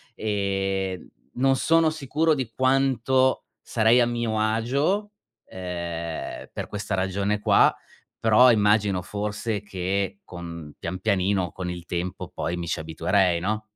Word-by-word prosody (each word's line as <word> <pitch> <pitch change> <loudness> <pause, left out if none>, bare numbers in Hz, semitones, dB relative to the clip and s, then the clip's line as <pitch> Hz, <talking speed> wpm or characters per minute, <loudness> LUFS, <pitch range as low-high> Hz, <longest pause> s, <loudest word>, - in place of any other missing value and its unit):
Ehm, 95 -2 -1 0.3
non 135 +2 +2
sono 165 +4 +3
sicuro 155 +1 +1
di 130 -6 -3
quanto 130 0 +2 0.2
sarei 115 +2 +3
a 120 - +5
mio 120 -2 -1
agio, 135 - 0 0.3
ehm, 85 -3 -5
per - - -5
questa 105 -1 -3
ragione 100 +2 0
qua, - - +4 0.4
però 115 +3 +6
immagino 105 -3 +3
forse 105 +2 -3
che 95 0 -2
con 85 -4 -8
pian 90 +2 -4
pianino 95 -3 +1
con 90 +1 -5
il 90 -1 -6
tempo 90 +1 -4
poi 85 - -2
mi 85 -1 -5
ci - - -2
abituerei, 85 +2 +1
no? 105 +3 -1
100 Hz, 130 wpm, -25 LUFS, 90-120 Hz, 0.4 s, però